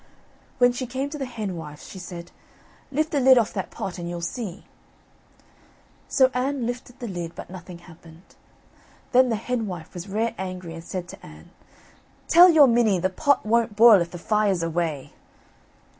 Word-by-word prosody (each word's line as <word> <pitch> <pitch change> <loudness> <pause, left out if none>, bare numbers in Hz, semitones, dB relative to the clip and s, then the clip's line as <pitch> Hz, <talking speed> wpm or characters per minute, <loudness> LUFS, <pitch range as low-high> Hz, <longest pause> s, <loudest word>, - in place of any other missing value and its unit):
When 245 -1 +5
she 245 +1 -5
came 265 +3 -4
to 300 - -6
the 270 - -3
henwife's, 180 -11 -7
she 190 - -10
said, 175 -2 -9 0.6
"Lift 310 +3 -1
the 290 - +1
lid 260 0 +6
off 230 -2 +1
the 195 - -1
pot 185 0 -7
and 170 0 -5
you'll 175 0 -5
see." 200 0 -5 1.4
So 260 -1 +3
Anne 255 0 -1
lifted 245 +1 -6
the 240 - -6
lid 175 -4 -6
but - - -9
nothing 180 -1 -10
happened. 165 -1 -16 0.9
Then 255 0 +5
the 225 - +1
henwife 210 -7 -4
was 180 +2 -8
rare 220 +4 -1
angry 185 -3 -6
and 165 0 -9
said 180 0 -6
to - - -12
Anne, 75 0 -14 0.8
"Tell 350 +2 +8
your 315 -4 +7
minnie 230 -5 +3
the 185 +2 -1
pot 285 +6 +1
won't 225 -1 +1
boil 220 -3 +7
if 170 - -2
the 175 - -8
fire's 200 -1 0
away." 165 -4 -3
205 Hz, 175 wpm, -24 LUFS, 175-245 Hz, 1.4 s, Tell